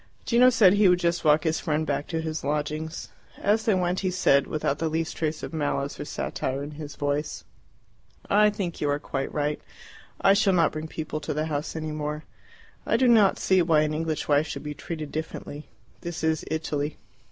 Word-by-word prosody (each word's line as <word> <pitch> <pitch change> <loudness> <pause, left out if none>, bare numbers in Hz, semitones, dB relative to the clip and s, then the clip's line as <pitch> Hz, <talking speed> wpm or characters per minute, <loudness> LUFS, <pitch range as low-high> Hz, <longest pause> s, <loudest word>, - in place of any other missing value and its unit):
Gino 245 +1 +6
said 205 -6 +5
he 205 -1 +5
would 180 - +5
just 170 -1 0
walk 150 -1 +4
his 160 -1 0
friend 155 -2 -1
back 145 -1 -2
to 160 -1 -2
his 160 0 -4
lodgings. 150 +2 -3 0.3
As 215 +2 +1
they 215 - +3
went 180 0 0
he 190 - 0
said, 140 -6 +3
without 150 -2 -1
the 165 - 0
least 160 +1 -2
trace 155 -1 -2
of - - -6
malice 145 -2 -2
or 145 - -4
satire 135 -1 -3
in 145 - -6
his 150 -1 -8
voice, 145 +1 -2 0.8
"I 210 +1 +5
think 195 -5 -4
you 145 - +1
are 145 - +1
quite 135 -2 -4
right. 150 0 -1 0.6
I 195 - +5
shall 200 -1 +3
not 165 -3 +3
bring 155 0 -5
people 155 -1 -5
to 150 - -4
the 155 +1 0
house 150 0 -3
any 155 -1 -3
more. 150 0 -4 0.6
I - - +1
do 260 - +3
not 220 -5 +5
see 190 -1 +3
why 160 -3 +4
an 155 0 0
English 160 0 -2
wife 145 +1 +3
should - - -6
be 150 0 -4
treated 155 -1 -6
differently. 155 -1 -6 0.3
This 170 -1 -6
is 160 -1 +1
Italy." 155 -2 -2
155 Hz, 205 wpm, -26 LUFS, 150-175 Hz, 0.8 s, Gino